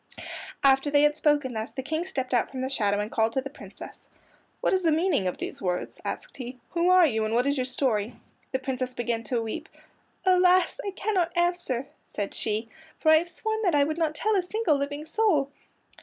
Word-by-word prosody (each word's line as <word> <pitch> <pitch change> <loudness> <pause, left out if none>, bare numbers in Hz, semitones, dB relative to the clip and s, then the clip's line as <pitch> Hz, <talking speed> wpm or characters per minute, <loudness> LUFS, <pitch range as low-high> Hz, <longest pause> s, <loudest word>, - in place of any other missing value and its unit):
After 270 +1 +4
they 290 0 +4
had 295 0 +4
spoken 295 -4 +2
thus 220 +1 -4
the 265 - -4
King 315 +5 -2
stepped 265 -9 -3
out 245 - +2
from 260 -1 -5
the 260 +1 -2
shadow 205 -6 +1
and 210 +1 -3
called 225 0 +1
to 265 - +1
the 275 +1 -7
Princess. - - -11 0.5
"What - - +1
is 375 - +3
the 330 -3 +3
meaning 310 - +2
of 180 - -2
these - - -6
words?" 180 -1 -3
asked - - -5
he. 255 -1 -7
"Who 345 +1 +2
are 365 -1 +7
you, 220 -7 +1
and 215 +1 -1
what 245 - +3
is 285 0 +2
your 255 -2 -1
story?" 245 -4 0 0.4
The 260 - +1
Princess 255 -1 -3
began 235 -1 -1
to 235 +1 0
weep. 220 - -5 0.6
"Alas, 365 0 +4
I 405 - -2
cannot 375 -4 -1
answer," 345 -8 0 0.3
said 205 -1 -2
she, 220 +1 -2 0.3
"for 315 - +2
I 315 - +8
have 345 +2 -1
sworn 440 +5 -3
that 360 -7 +2
I 285 - +5
would 310 +3 -2
not 315 -2 0
tell 435 +6 +1
a 385 - +3
single 360 -2 +1
living 285 +2 -3
soul." 320 -6 +2
280 Hz, 215 wpm, -27 LUFS, 245-345 Hz, 0.6 s, I